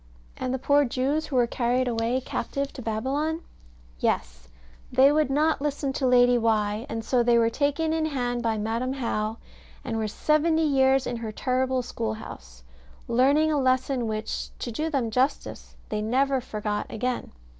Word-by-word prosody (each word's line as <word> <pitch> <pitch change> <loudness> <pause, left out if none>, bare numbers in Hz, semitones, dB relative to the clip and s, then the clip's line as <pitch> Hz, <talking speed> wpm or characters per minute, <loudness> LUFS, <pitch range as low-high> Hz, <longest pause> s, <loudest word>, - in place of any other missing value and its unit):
And 255 - -3
the 260 - 0
poor 285 +3 +3
Jews, 275 +4 -1
who 275 - -4
were 245 -1 +4
carried 245 +1 0
away 235 +1 0
captive 275 +2 -3
to 260 - -8
Babylon? 275 +9 -1 0.6
Yes; - - -2 0.4
they 260 +3 +6
would 305 -2 +2
not 300 +2 +2
listen 285 -1 -2
to 265 - 0
Lady 245 -1 +5
Why, 215 +1 0
and 225 -4 -4
so 250 -2 +2
they 240 0 +4
were 230 0 +3
taken 295 +4 0
in 320 -1 0
hand 245 -4 -2
by 225 -2 0
Madam 230 +5 -1
How, 225 -4 -2 0.5
and 230 -3 -2
were 220 -1 -1
seventy 315 +7 +2
years 270 -2 +3
in 240 - -3
her 225 -2 -5
terrible 255 +2 0
school 225 -2 -3
house, - - -11 0.4
learning 280 +6 +3
a 295 - +1
lesson 255 -1 +1
which, 215 0 -3
to 240 - -5
do 310 +8 -2
them 260 -7 -1
justice, 255 +5 -1
they 210 0 -2
never 265 +4 +1
forgot 210 -3 -3
again. 250 +3 -3
255 Hz, 170 wpm, -26 LUFS, 225-275 Hz, 0.6 s, they